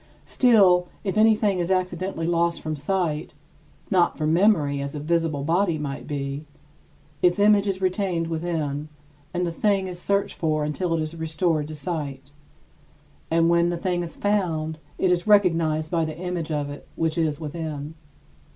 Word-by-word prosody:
Still, 195 Hz, -8 st, +4 dB, 0.2 s
if 195 Hz, -1 st, -2 dB
anything 215 Hz, -3 st, +3 dB
is 175 Hz, 0 st, -1 dB
accidentally 185 Hz, -2 st, -1 dB
lost 170 Hz, 0 st, +1 dB
from 155 Hz, 0 st, -3 dB
sight 160 Hz, 0 st, -2 dB, 0.6 s
not 180 Hz, -3 st, +3 dB
from 155 Hz, 0 st, +1 dB
memory, 160 Hz, -7 st, +3 dB
as 140 Hz, +1 st, -5 dB
a -, -, -3 dB
visible 160 Hz, -2 st, 0 dB
body 170 Hz, +2 st, +1 dB
might 145 Hz, -2 st, -5 dB
be 140 Hz, +1 st, -4 dB, 0.7 s
its 175 Hz, -1 st, +4 dB
image 205 Hz, 0 st, +4 dB
is 190 Hz, -1 st, -2 dB
retained 185 Hz, -2 st, 0 dB
within, 160 Hz, -3 st, -3 dB, 0.4 s
and 180 Hz, 0 st, -1 dB
the 170 Hz, -, -2 dB
thing 195 Hz, +2 st, +1 dB
is 180 Hz, -1 st, -6 dB
searched 200 Hz, +1 st, 0 dB
for 155 Hz, -2 st, 0 dB
until 165 Hz, +3 st, -1 dB
it 160 Hz, -, -1 dB
is 155 Hz, +1 st, -6 dB
restored 160 Hz, -1 st, 0 dB
to 155 Hz, -, -7 dB
sight. 145 Hz, -3 st, -5 dB, 1.0 s
And 165 Hz, 0 st, +3 dB
when 170 Hz, 0 st, +3 dB
the 175 Hz, -, -2 dB
thing 175 Hz, 0 st, -1 dB
is 170 Hz, -2 st, -6 dB
found, 165 Hz, -6 st, -1 dB, 0.2 s
it 185 Hz, -, +2 dB
is 175 Hz, +3 st, 0 dB
recognized 165 Hz, -6 st, +3 dB
by 165 Hz, -2 st, +1 dB
the 155 Hz, -1 st, -4 dB
image 175 Hz, -2 st, -3 dB
of 145 Hz, -1 st, -2 dB
it 145 Hz, -, -10 dB
which 160 Hz, -1 st, 0 dB
is 155 Hz, -3 st, 0 dB
within. 155 Hz, -1 st, -5 dB
165 Hz, 165 wpm, -24 LUFS, 155-185 Hz, 1.0 s, Still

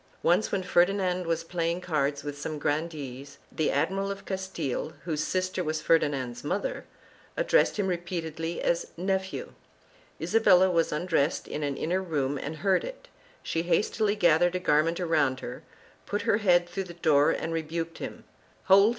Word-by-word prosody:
Once 180 Hz, +5 st, +3 dB
when 195 Hz, -2 st, 0 dB
Ferdinand 180 Hz, 0 st, +2 dB
was 165 Hz, 0 st, 0 dB
playing 170 Hz, 0 st, -1 dB
cards 145 Hz, -5 st, -1 dB
with 145 Hz, -1 st, -5 dB
some 150 Hz, +2 st, -5 dB
grandees, 145 Hz, -3 st, -3 dB
the 155 Hz, -, 0 dB
Admiral 195 Hz, +8 st, 0 dB
of 200 Hz, 0 st, -6 dB
Castile, 190 Hz, -9 st, -3 dB
whose 155 Hz, -3 st, -1 dB
sister 185 Hz, 0 st, -1 dB
was 155 Hz, -1 st, -1 dB
Ferdinand's 135 Hz, -8 st, +1 dB
mother, 185 Hz, +7 st, -2 dB, 0.5 s
addressed -, -, +3 dB
him 205 Hz, -, +1 dB
repeatedly 170 Hz, -2 st, -3 dB
as 170 Hz, 0 st, +1 dB
" -, -, -33 dB, 0.2 s
nephew"; 190 Hz, 0 st, -4 dB, 0.7 s
Isabella 190 Hz, -4 st, +4 dB
was 165 Hz, -2 st, +2 dB
undressed 155 Hz, -1 st, 0 dB
in 150 Hz, -, -4 dB
an 145 Hz, -2 st, -2 dB
inner 180 Hz, +4 st, 0 dB
room 145 Hz, -6 st, -1 dB
and 150 Hz, +4 st, -5 dB
heard 190 Hz, -1 st, +3 dB
it; -, -, -8 dB, 0.3 s
she 165 Hz, -, -1 dB
hastily 205 Hz, +5 st, +1 dB
gathered 175 Hz, -2 st, +4 dB
a -, -, +1 dB
garment 165 Hz, 0 st, +2 dB
around 150 Hz, -7 st, +1 dB
her, 125 Hz, -, -7 dB, 0.5 s
put 205 Hz, -, -2 dB
her 205 Hz, -, +3 dB
head 175 Hz, -4 st, +3 dB
through 190 Hz, +2 st, -4 dB
the 170 Hz, -1 st, -10 dB
door 150 Hz, -4 st, +4 dB
and 165 Hz, -, -1 dB
rebuked 165 Hz, +1 st, -3 dB
him -, -, -7 dB, 0.2 s
— -, -, -33 dB
"Hold! 195 Hz, +2 st, +6 dB
170 Hz, 165 wpm, -28 LUFS, 150-185 Hz, 0.7 s, Hold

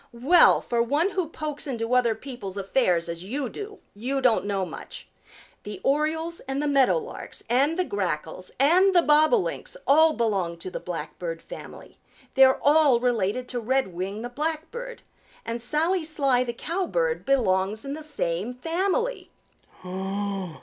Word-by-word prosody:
"Well, 285 Hz, +9 st, +5 dB
for 235 Hz, -1 st, 0 dB
one 295 Hz, +11 st, +1 dB
who 370 Hz, -5 st, -2 dB
pokes 305 Hz, -2 st, -4 dB
into 235 Hz, -2 st, -2 dB
other 240 Hz, -3 st, +3 dB
people's 220 Hz, -6 st, -8 dB
affairs 190 Hz, -4 st, +1 dB
as 170 Hz, +1 st, -5 dB
you 255 Hz, +6 st, -3 dB
do, 415 Hz, -, -8 dB, 0.2 s
you 255 Hz, +7 st, -2 dB
don't 245 Hz, -6 st, +2 dB
know 195 Hz, -2 st, -1 dB
much. -, -, -9 dB, 0.5 s
The 205 Hz, 0 st, -7 dB
Orioles 315 Hz, +4 st, 0 dB
and 270 Hz, +1 st, -2 dB
the 295 Hz, -, 0 dB
Meadow 275 Hz, -, +4 dB
Larks 470 Hz, 0 st, -6 dB
and 275 Hz, +8 st, +2 dB
the 365 Hz, -, +2 dB
Grackles 185 Hz, -, -3 dB
and 365 Hz, +7 st, +4 dB
the 350 Hz, -, +6 dB
Bobolinks 310 Hz, +11 st, +2 dB
all 315 Hz, +3 st, +5 dB
belong 195 Hz, -, -1 dB
to 180 Hz, +2 st, -7 dB
the -, -, -4 dB
Blackbird 165 Hz, 0 st, -5 dB
family. -, -, -11 dB, 0.3 s
They're 265 Hz, -1 st, +6 dB
all 290 Hz, -4 st, +5 dB
related 245 Hz, 0 st, 0 dB
to 245 Hz, -, -2 dB
Redwing 215 Hz, -4 st, -2 dB
the 245 Hz, -, -4 dB
Blackbird, 325 Hz, -, -4 dB, 0.4 s
and 230 Hz, +1 st, -3 dB
Sally 325 Hz, +7 st, 0 dB
Sly 275 Hz, -5 st, +1 dB
the 240 Hz, -, -2 dB
Cowbird 390 Hz, -, -1 dB
belongs 215 Hz, -5 st, +1 dB
in 275 Hz, -, -4 dB
the 310 Hz, -, -6 dB
same 225 Hz, -, -3 dB
family." 380 Hz, -, -1 dB
265 Hz, 150 wpm, -25 LUFS, 215-315 Hz, 0.5 s, the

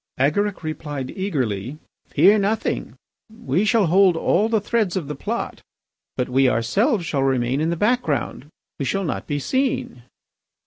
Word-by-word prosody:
Agaric 185 Hz, +9 st, 0 dB
replied 150 Hz, -4 st, -5 dB
eagerly: 130 Hz, -, -2 dB, 0.3 s
"Fear 210 Hz, +2 st, +5 dB
nothing. 205 Hz, +3 st, -1 dB, 0.3 s
We 220 Hz, -3 st, -1 dB
shall 220 Hz, -2 st, +3 dB
hold 180 Hz, 0 st, +4 dB
all 205 Hz, +6 st, +2 dB
the 225 Hz, -1 st, +2 dB
threads 210 Hz, -3 st, 0 dB
of 165 Hz, -6 st, -3 dB
the 150 Hz, -, -4 dB
plot, 140 Hz, -, -4 dB, 0.6 s
but 125 Hz, -, 0 dB
we 130 Hz, +1 st, +3 dB
ourselves 190 Hz, -, +1 dB
shall 140 Hz, -4 st, -1 dB
remain 130 Hz, 0 st, +1 dB
in 160 Hz, -, +1 dB
the 170 Hz, -, 0 dB
background. 170 Hz, -, -1 dB, 0.3 s
We 140 Hz, -, -1 dB
shall 195 Hz, +7 st, -1 dB
not 160 Hz, -, -3 dB
be 145 Hz, -, -1 dB
seen." 260 Hz, -, -1 dB
165 Hz, 150 wpm, -22 LUFS, 135-210 Hz, 0.6 s, Fear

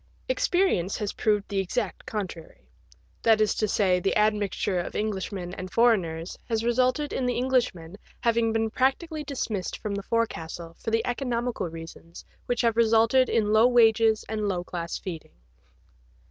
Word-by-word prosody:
Experience 360 Hz, -, +1 dB
has 210 Hz, -2 st, -3 dB
proved 210 Hz, -2 st, 0 dB
the 200 Hz, -1 st, -1 dB
exact 195 Hz, +1 st, -3 dB
contrary; 185 Hz, -6 st, -6 dB, 0.5 s
that 225 Hz, -1 st, +4 dB
is 215 Hz, -1 st, +3 dB
to 215 Hz, -, 0 dB
say, 190 Hz, -3 st, +2 dB
the 185 Hz, -, 0 dB
admixture 210 Hz, -3 st, +1 dB
of 175 Hz, -, -5 dB
Englishmen 190 Hz, -4 st, -3 dB
and 185 Hz, 0 st, -6 dB
foreigners 185 Hz, -8 st, +1 dB
has 225 Hz, -1 st, 0 dB
resulted 255 Hz, +5 st, +1 dB
in 255 Hz, -, -1 dB
the 245 Hz, -, 0 dB
Englishman 240 Hz, -10 st, 0 dB, 0.3 s
having 230 Hz, -1 st, +2 dB
been 225 Hz, 0 st, 0 dB
practically 300 Hz, +6 st, 0 dB
dismissed 225 Hz, -9 st, -3 dB
from 210 Hz, -, -4 dB
the 200 Hz, -, -3 dB
forecastle 170 Hz, -7 st, -3 dB
for -, -, -4 dB
the 225 Hz, 0 st, +1 dB
economical 245 Hz, -4 st, -2 dB
reasons 165 Hz, +1 st, -11 dB, 0.2 s
which 245 Hz, -1 st, 0 dB
have 230 Hz, -2 st, +1 dB
resulted 230 Hz, +3 st, +4 dB
in 215 Hz, -2 st, +1 dB
low 220 Hz, +2 st, +6 dB
wages 225 Hz, -2 st, +4 dB
and 215 Hz, -1 st, -2 dB
low 180 Hz, -3 st, -1 dB
class 170 Hz, -1 st, -4 dB
feeding. 170 Hz, -4 st, -8 dB
220 Hz, 155 wpm, -26 LUFS, 185-235 Hz, 0.5 s, low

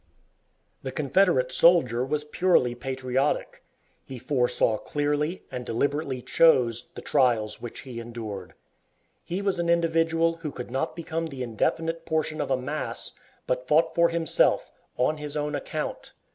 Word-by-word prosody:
The 130 Hz, -, -5 dB
Confederate 140 Hz, -2 st, +2 dB
soldier 130 Hz, -7 st, +4 dB
was 150 Hz, +3 st, -1 dB
purely 150 Hz, -5 st, +2 dB
patriotic. 130 Hz, +2 st, -2 dB, 0.4 s
He 130 Hz, -, -7 dB
foresaw 125 Hz, -4 st, +1 dB
clearly, 150 Hz, +4 st, -1 dB
and 125 Hz, -, -4 dB
deliberately 135 Hz, +2 st, -1 dB
chose, 125 Hz, -8 st, +4 dB
the -, -, -8 dB
trials 120 Hz, -6 st, +1 dB
which 120 Hz, -, -7 dB
he 125 Hz, -3 st, -8 dB
endured. 110 Hz, -5 st, -7 dB, 0.7 s
He 185 Hz, +4 st, -4 dB
was 195 Hz, -3 st, 0 dB
an 170 Hz, 0 st, 0 dB
individual 165 Hz, 0 st, +2 dB
who 165 Hz, -2 st, -5 dB
could 125 Hz, -2 st, -8 dB
not 135 Hz, +6 st, -2 dB
become 165 Hz, 0 st, -3 dB
the 135 Hz, -4 st, -6 dB
indefinite 165 Hz, +8 st, -1 dB
portion 155 Hz, -1 st, -1 dB
of -, -, -3 dB
a 130 Hz, -, +2 dB
mass, 140 Hz, +4 st, -3 dB, 0.3 s
but 125 Hz, 0 st, -2 dB
fought 160 Hz, +2 st, +3 dB
for 170 Hz, 0 st, +4 dB
himself, 165 Hz, -1 st, +2 dB, 0.3 s
on 140 Hz, +5 st, +1 dB
his 150 Hz, 0 st, -5 dB
own 150 Hz, 0 st, -2 dB
account. -, -, -4 dB
145 Hz, 145 wpm, -26 LUFS, 125-165 Hz, 0.7 s, soldier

